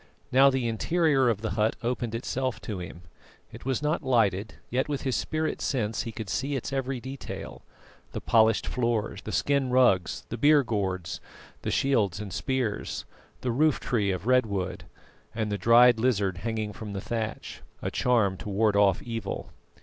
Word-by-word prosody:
Now 135 +2 +7
the 130 -3 0
interior 135 +2 +2
of 105 -3 -1
the 110 - -2
hut 105 +2 +1
opened 120 -1 -2
itself 130 +2 -2
to 105 -4 -5
him. 90 0 -8 0.5
It - - -11
was 135 +1 -1
not 150 +2 +1
lighted, 110 -6 +1 0.2
yet 130 +4 0
with 145 -2 -2
his 130 -2 0
spirit 155 0 -2
sense 110 -5 -1
he 115 - -5
could 110 -1 -6
see 135 +8 -1
its 135 +1 -4
every 135 -1 -2
detail: 130 +2 -7 0.5
the - - -4
polished 110 -1 +3
floor, 115 -3 -1
the - - -5
skin 140 -2 +1
rugs, 125 -9 +3
the 120 - -5
beer 145 +2 +5
gourds, 95 -7 -2 0.4
the - - -3
shields 105 -9 +1
and 100 -3 -6
spears, 130 -6 -2 0.4
the 125 - -1
roof 150 +4 +2
tree 105 -5 0
of 95 0 -2
red 125 -1 +4
wood, 95 -3 -3 0.5
and 110 -2 -1
the 100 - 0
dried 120 +3 +6
lizard 100 -7 +1
hanging 110 0 -3
from 105 -2 -7
the 100 - -3
thatch, 110 -1 -4 0.2
a - - -2
charm 110 -7 +2
to 110 -1 -7
ward 105 +1 +2
off 100 -3 +3
evil. 115 -4 -5
115 Hz, 175 wpm, -27 LUFS, 105-130 Hz, 0.5 s, Now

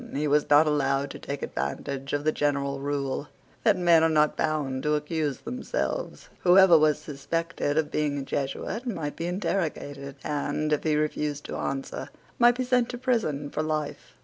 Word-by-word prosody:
He 150 +2 0
was 145 +1 +2
not 145 +2 +7
allowed 140 -2 +1
to - - -8
take 140 0 -5
advantage 130 - -4
of 145 0 -1
the 155 - +3
general 140 -2 0
rule, 140 0 -2 0.4
that 210 -4 +4
men 170 -2 +5
are 165 - +4
not 150 -1 +3
bound 145 -4 -1
to 150 +1 +1
accuse 150 -1 -1
themselves. - - -4
Whoever 185 -1 +7
was 155 -1 +4
suspected 155 +1 -3
of 160 -2 +1
being 150 -2 0
a 140 - -3
Jesuit 145 - -3
might 160 -10 -3
be 165 - -3
interrogated, 150 -7 -3
and, 150 +1 -1
if 150 - 0
he 155 -2 +2
refused 150 -1 -1
to - - -5
answer, 135 0 -4 0.3
might 240 0 +6
be 255 - 0
sent 250 -1 +2
to 245 - -5
prison 220 - -1
for 155 - -1
life. 155 -1 -3
150 Hz, 175 wpm, -27 LUFS, 140-170 Hz, 0.4 s, not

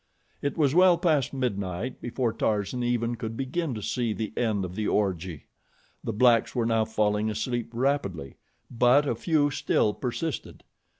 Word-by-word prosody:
It 140 - -2
was 145 -4 +3
well 180 0 +6
past 155 -7 +1
midnight 110 -3 -3
before 120 -1 -1
Tarzan 110 +1 -1
even 120 -1 0
could 115 -1 -5
begin 135 +1 -2
to 105 - -6
see 120 -1 -1
the 110 0 -4
end 110 -5 0
of 90 - -7
the 105 +2 -2
orgy. 90 -6 -1 0.6
The - - -2
blacks 115 +1 +3
were 120 -2 +1
now 115 -1 +2
falling 105 -1 0
asleep 115 +2 -2
rapidly; 115 - -1 0.3
but 125 +5 +4
a - - +1
few 145 +4 +1
still 105 -5 +1
persisted. 135 +5 -4
115 Hz, 160 wpm, -27 LUFS, 105-130 Hz, 0.6 s, well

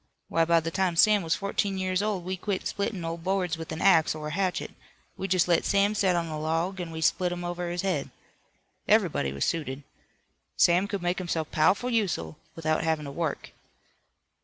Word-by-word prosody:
Why, 165 0 +2
by 170 0 +4
the 165 +1 -4
time 185 -1 0
Sam 210 +4 +5
was 165 -2 0
fourteen 200 0 -1
years 185 0 0
old 205 -4 -1
we 185 +1 -2
quit 185 +1 -3
splittin' 200 -3 -3
old 165 0 -5
boards 185 -2 0
with 160 0 -8
an 160 - -4
axe 165 -6 +5
or 150 -1 -5
a - - -6
hatchet. 185 0 -1 0.4
We 195 - -4
jest 185 -2 +2
let 170 -2 +3
Sam 200 +1 +2
set 190 -3 +2
on 170 -1 0
a 155 -2 -5
log 165 +4 -1
an' 175 - -5
we 160 0 -6
split 180 +2 +2
'em 175 0 -4
over 175 0 -3
his 175 +1 -3
head. 180 -8 -1 0.8
Everybody 70 - +2
was 70 0 -1
suited. 145 -4 -3 0.7
Sam 180 +3 +4
could 200 -3 -4
make 175 +1 0
himself 165 -3 -3
pow'ful 190 +10 +2
useful 160 - -1 0.2
without 155 -1 0
havin' 160 -2 0
to 140 - -6
work." 160 0 -3
175 Hz, 200 wpm, -27 LUFS, 160-190 Hz, 0.8 s, Sam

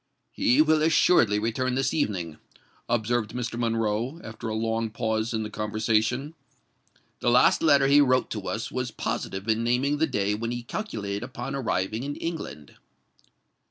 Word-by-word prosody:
"He 135 +6 +4
will 155 0 +3
assuredly 155 - +4
return 120 +4 -1
this 135 +1 0
evening," 90 - -2 0.5
observed 120 -1 0
Mr. 120 -1 -3
Monroe, 115 +4 -1
after 110 0 -7
a 110 - -2
long 115 0 -1
pause 110 0 -1
in 110 -2 -1
the 105 - -5
conversation. 110 +6 0 0.9
"The - - +1
last 120 - +5
letter 145 -4 +5
he 140 +2 +6
wrote 130 -2 +2
to 105 -3 -4
us 110 0 -3
was 125 -1 -2
positive 95 -2 -4
in 110 +1 +1
naming 130 +5 +1
the 160 - +3
day 100 0 0
when 115 +2 -3
he 120 0 -4
calculated 105 - -4
upon 130 +2 -6
arriving 110 -5 -1
in 145 +2 -4
England." 155 - -6
115 Hz, 160 wpm, -26 LUFS, 110-135 Hz, 0.9 s, he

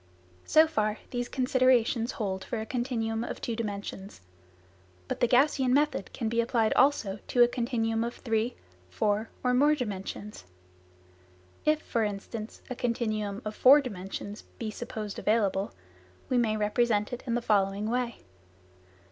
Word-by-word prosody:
So 315 +1 +6
far, 215 -9 0
these 245 -1 -2
considerations 255 -2 +2
hold 190 -4 -3
for 235 - -4
a 220 - -4
continuum 230 -2 -2
of - - -5
two 230 - -3
dimensions. 200 - -5 0.9
But - - -3
the 240 - +4
Gaussian 260 +1 +3
method 290 -8 +1
can 230 - -3
be 230 +1 +2
applied 230 -2 +1
also 230 -8 +2
to 245 - +5
a - - +6
continuum 230 -2 -1
of 235 +1 -4
three, 225 0 -1 0.3
four 210 - 0
or 250 0 +2
more 290 +4 +5
dimensions. 205 - -5 1.2
If, 305 0 +2
for 230 - 0
instance, 210 +2 -5
a 255 - -5
continuum 215 -3 -2
of 215 0 -4
four 275 +3 +8
dimensions 205 -4 -6 0.2
be 220 -2 -4
supposed 215 -3 -6
available, 205 -3 +1 0.6
we 255 - +2
may 220 -2 +1
represent 210 0 +1
it 245 - -4
in 235 - 0
the - - +2
following 200 -1 +1
way. 240 0 -1
230 Hz, 150 wpm, -29 LUFS, 210-250 Hz, 1.2 s, four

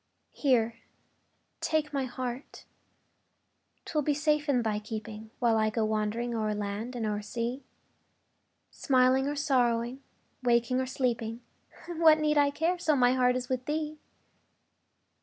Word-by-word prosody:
Here, 235 -5 +1 0.8
take 305 -2 -1
my 275 -2 0
heart 250 +1 -6 1.2
'twill 305 - 0
be 290 0 +1
safe 300 0 +1
in 250 -4 +2
thy 215 -2 0
keeping, 215 0 -7
While 230 -3 +2
I 215 0 +2
go 220 0 0
wandering 215 +3 -1
o'er 215 -2 -1
land 210 +4 -4
and 230 -2 -2
o'er 210 -1 -1
sea; 235 +5 -4 1.1
Smiling 260 0 +3
or 290 - -2
sorrowing, 250 -3 +1 0.4
waking 240 +1 +2
or 260 - -3
sleeping, 235 -3 -2 0.5
What 325 -2 +5
need 300 -1 +2
I 285 -1 +4
care, 330 +5 -1
so 310 -3 +2
my 250 -2 +4
heart 250 -1 +3
is 250 0 -3
with 255 -1 -2
thee? 305 0 -3
250 Hz, 140 wpm, -29 LUFS, 225-285 Hz, 1.2 s, What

